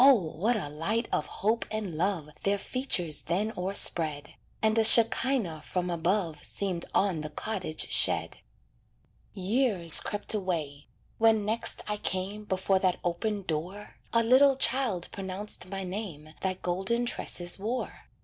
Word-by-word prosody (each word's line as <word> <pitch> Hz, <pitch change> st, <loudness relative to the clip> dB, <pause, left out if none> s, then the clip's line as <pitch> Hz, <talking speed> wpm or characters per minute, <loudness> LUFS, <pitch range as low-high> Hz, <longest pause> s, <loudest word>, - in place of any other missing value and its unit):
what 225 Hz, -, +4 dB
a 185 Hz, -, -3 dB
light 195 Hz, +11 st, -2 dB
of 150 Hz, -, -1 dB
hope 220 Hz, +3 st, -1 dB
and 215 Hz, -5 st, -4 dB
love 175 Hz, -2 st, -1 dB
Their 200 Hz, +1 st, +1 dB
features 180 Hz, -, -1 dB
then 200 Hz, -, -2 dB
o'erspread; 165 Hz, -5 st, +1 dB, 0.3 s
And 220 Hz, 0 st, +3 dB
a -, -, +4 dB
shekinah 225 Hz, -, +4 dB
from 180 Hz, -1 st, -3 dB
above 170 Hz, -2 st, -1 dB
Seemed 185 Hz, -4 st, -3 dB
on 190 Hz, -6 st, +1 dB
the 155 Hz, -, -6 dB
cottage 180 Hz, -1 st, -4 dB
shed. -, -, +2 dB, 1.0 s
Years 195 Hz, -, +5 dB
crept 205 Hz, +1 st, +2 dB
away. 160 Hz, -8 st, -3 dB, 0.3 s
When 220 Hz, -2 st, +3 dB
next 220 Hz, +2 st, -1 dB
I 210 Hz, 0 st, -2 dB
came 200 Hz, +2 st, -4 dB
Before 190 Hz, 0 st, 0 dB
that 185 Hz, -1 st, 0 dB
open 200 Hz, +4 st, -2 dB
door, 180 Hz, +5 st, -6 dB
A 230 Hz, 0 st, +3 dB
little 265 Hz, +4 st, +5 dB
child 245 Hz, -9 st, +1 dB
pronounced 195 Hz, 0 st, -6 dB
my 195 Hz, 0 st, -5 dB
name 180 Hz, -6 st, -7 dB
That 185 Hz, -1 st, -3 dB
golden 190 Hz, +7 st, 0 dB
tresses 175 Hz, -6 st, -2 dB
wore. 230 Hz, +6 st, -4 dB
195 Hz, 140 wpm, -28 LUFS, 175-220 Hz, 1.0 s, Years